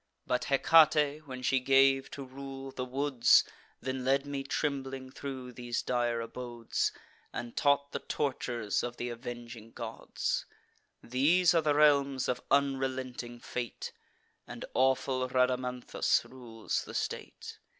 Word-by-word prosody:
But 125 0 0
Hecate, 150 +1 +4
when 130 -1 -7
she 130 +1 +3
gave 135 +1 +4
to 140 - -7
rule 135 0 -8
the 130 - -4
woods, 130 -1 +4 0.4
Then 130 0 -3
led 135 +2 +2
me 140 -1 -3
trembling 135 -2 -3
thro' 130 -2 -6
these 120 -1 -3
dire 120 -1 0
abodes, 120 0 -2 0.4
And 120 -1 -6
taught 140 0 +2
the - - -3
tortures 120 -6 -1
of 120 0 -5
th' 120 0 -3
avenging 120 -1 -8
gods. - - -3 0.6
These 160 +9 +4
are 165 - +4
the 150 -2 +2
realms 140 -3 +4
of 125 0 -1
unrelenting 130 -3 0
fate; 120 -3 -5 0.6
And - - -7
awful 130 0 +2
Rhadamanthus 125 -1 +1
rules 120 -4 -4
the - - -9
state. - - -5
130 Hz, 130 wpm, -31 LUFS, 125-140 Hz, 0.6 s, Hecate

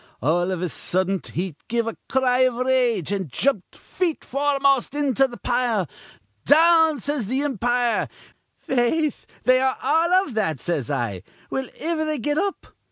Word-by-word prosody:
All 175 +8 +1
iv 185 -2 -2
a - - 0
suddent 185 +3 -1
he 175 -2 -4
give 235 0 0
a 230 - -4
cry 255 -1 +2
iv 255 -2 +3
rage, 250 - +1
an' 190 -4 -2
jumped 210 - -1
feet 345 -4 -3
foremost 275 -1 +1
into 270 -2 +2
th' 240 -2 -12
pile. 240 -7 0 0.6
'Down!' 320 -1 +5
says 280 -3 -3
th' 245 - -3
impire. 245 -3 0 0.5
'Faith, 265 +4 0 0.2
they 255 0 +5
are 265 0 +1
all 330 +3 +2
iv 270 - -8
that,' 160 - -1
says 145 -4 -2
I. 100 -7 -2 0.3
'Will 265 -2 -3
iver 320 0 -1
they 310 -1 -1
get 290 +4 -1
up?' 395 0 -2
250 Hz, 160 wpm, -23 LUFS, 195-290 Hz, 0.6 s, Down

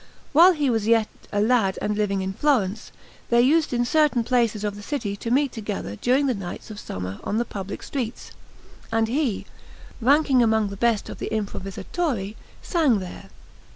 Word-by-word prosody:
While 345 +5 +8
he 295 -4 0
was 220 -2 0
yet 225 -1 +3 0.2
a 205 - 0
lad 215 -3 +2
and 210 - -1
living 200 -2 0
in 190 0 -3
Florence, 220 -6 0 0.4
they 235 - +4
used 310 +4 +3
in 240 -1 +1
certain 295 -3 +3
places 230 -3 +1
of 205 -1 -2
the 205 - -9
city 210 -4 -3
to 230 - -5
meet 275 +2 +2
together 205 - -5
during 255 - +2
the 265 - +2
nights 195 +1 -7
of 210 - -8
summer 95 - -6
on 210 - -1
the 240 - +1
public 200 -2 -6
streets; 250 -4 -5 0.6
and 225 0 +2
he, 250 -3 -1 0.6
ranking 275 +1 +4
among 220 -2 +2
the 200 - -6
best 230 0 +1
of - - -8
the - - -3
improvisatori, 210 - -3 0.3
sang 310 - +2
there. 190 +1 -8
225 Hz, 180 wpm, -24 LUFS, 205-260 Hz, 0.6 s, While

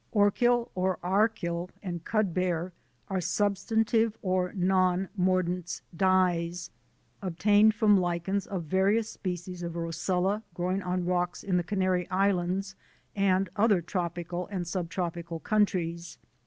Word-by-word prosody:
ORCHIL 235 +3 +3
OR 185 0 0
ARCHIL 180 -3 0
AND 175 -3 -5
CUDBEAR 180 -4 0 0.3
are 190 -2 -1
substantive 220 +4 +1
or 185 -1 0
non 185 -1 +2
mordants 180 -2 0
dyes, 175 -2 +1 0.5
obtained 205 +4 +4
from 210 -4 +5
Lichens 180 +2 -1
of 185 -4 -3
various 195 +7 +1
species 180 -1 -5
of 170 -1 -4
Roccella 180 +4 -1
growing 185 +2 -1
on 180 -1 -2
rocks 180 0 -1
in 190 -2 0
the 175 - +1
Canary 185 -1 0
Islands 190 0 0 0.4
and 195 -1 +2
other 205 -3 +4
tropical 175 0 -3
and 185 -4 -4
sub 170 -1 -3
tropical 170 -2 -4
countries. 170 -5 0
185 Hz, 120 wpm, -28 LUFS, 175-200 Hz, 0.5 s, from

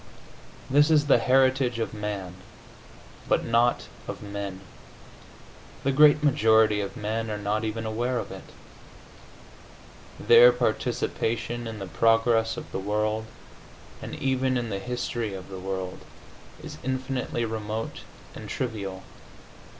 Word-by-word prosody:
This 145 +3 +4
is 150 -2 +4
the 140 -4 +5
heritage 130 0 +3
of 115 0 -3
man, 105 -4 -4 1.0
but - - +2
not 120 +1 +2 0.2
of - - -6
men. 100 -2 -6 1.2
The 135 - +2
great 150 +2 +6
majority 110 -7 +4
of 100 -1 -5
men 110 +1 -2
are 105 - -3
not 105 +1 -1
even 110 +1 -3
aware 120 +3 -1
of - - -4
it. - - -9 1.7
Their 120 +1 +8
participation 120 0 -2
in 110 -1 -6
the 100 - -5
progress 115 +4 +2
of - - -8
the - - -3
world, 105 +2 -1 0.8
and - - -6
even 130 -1 0
in 120 -2 -3
the 100 - -2
history 120 -2 -3
of 95 0 -9
the 95 -1 -7
world, 95 -1 -4 0.6
is - - -9
infinitely 130 -2 -2
remote 110 0 -4 0.3
and - - -9
trivial. 100 -6 -4
115 Hz, 125 wpm, -26 LUFS, 105-125 Hz, 1.7 s, Their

